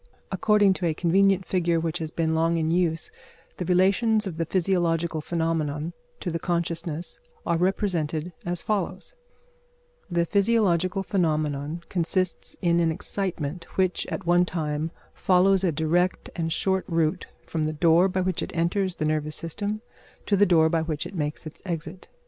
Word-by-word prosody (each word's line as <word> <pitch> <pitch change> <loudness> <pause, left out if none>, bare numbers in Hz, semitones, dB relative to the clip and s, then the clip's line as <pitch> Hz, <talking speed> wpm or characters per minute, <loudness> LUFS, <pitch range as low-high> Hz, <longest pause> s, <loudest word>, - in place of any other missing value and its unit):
According 205 0 +4
to 175 - +2
a 160 - 0
convenient 190 +3 +3
figure 170 -2 +1
which 165 -1 -2
has 160 -1 -3
been 160 0 0
long 165 +1 +2
in 160 0 0
use, 170 -2 0 0.5
the 180 - -3
relations 200 +5 +3
of 180 -5 -5
the 165 -1 -1
physiological 170 -3 +1
phenomenon 160 -1 -1 0.3
to 175 - -2
the 165 - -2
consciousness 170 -1 -2 0.3
are 170 - +1
represented 175 -3 0
as 175 -1 -3
follows: 195 - -2 1.0
the 170 -1 +1
physiological 195 -2 +2
phenomenon 155 -3 -1
consists 180 0 -1
in 170 -1 +3
an 165 -1 +2
excitement 170 -2 -3
which, 185 -1 +1
at 195 - -5
one 175 +1 +4
time, 155 -3 -2 0.2
follows 190 +1 +3
a 180 - +3
direct 165 +4 0
and 165 -1 -2
short 190 +3 +1
route 165 +1 0 0.2
from 160 -2 -2
the 155 - 0
door 165 +3 +4
by 185 0 0
which 185 -2 -1
it - - -5
enters 185 +2 +1
the 155 - -2
nervous 155 -1 0
system 205 +6 -3 0.4
to 205 - +2
the 205 +1 +4
door 160 -3 +5
by 165 0 +1
which 160 -2 -3
it - - -8
makes 150 -2 -3
its 155 - -9
exit. 180 0 -5
170 Hz, 160 wpm, -26 LUFS, 160-185 Hz, 1.0 s, door